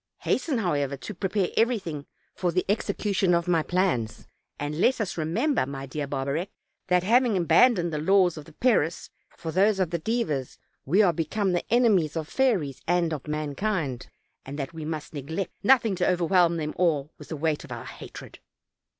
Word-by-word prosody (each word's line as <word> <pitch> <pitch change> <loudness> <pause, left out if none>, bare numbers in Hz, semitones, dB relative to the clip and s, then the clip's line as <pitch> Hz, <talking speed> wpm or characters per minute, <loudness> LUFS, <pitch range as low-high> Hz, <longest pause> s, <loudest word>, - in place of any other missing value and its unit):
Hasten, 270 0 0
however, 145 -9 -1
to 210 - -7
prepare 190 0 -1
everything 195 - 0 0.3
for 180 -2 -1
the 185 +1 0
execution 200 -2 +1
of 170 +1 0
my 170 -2 +3
plans, 155 - -1 0.3
and 150 +3 -3
let 255 0 +3
us 210 -4 -2
remember, 170 - 0
my 135 -1 -6
dear 140 +1 -4
Barbarec, 140 +7 -2 0.4
that, 180 -1 +3
having 235 +1 +3
abandoned 175 +1 +4
the 150 - -1
laws 185 +1 +3
of 155 -2 -9
the 160 - -15
Peris 175 - +1 0.3
for 165 -1 -5
those 195 +3 +3
of 180 -3 0
the 170 - -1
Dives, 160 - -2 0.3
we 190 +9 +4
are 175 -4 +3
become 185 +5 -1
the 175 - -2
enemies 200 -10 +3
of 155 -2 -3
fairies 190 - 0
and 170 -1 +2
of 150 -2 -6
mankind, 150 - -2 0.3
and 140 +2 -7
that 140 +1 -4
we 160 -2 -6
must 155 -1 -5
neglect 160 +7 -4
nothing 230 -2 +4
to 180 - +2
overwhelm 175 -1 +3
them 155 -1 -3
all 155 -5 +1
with - - -12
the 160 - -4
weight 155 +1 -1
of 150 - -12
our 120 -1 -6
hatred." - - -10
170 Hz, 180 wpm, -26 LUFS, 150-195 Hz, 0.4 s, abandoned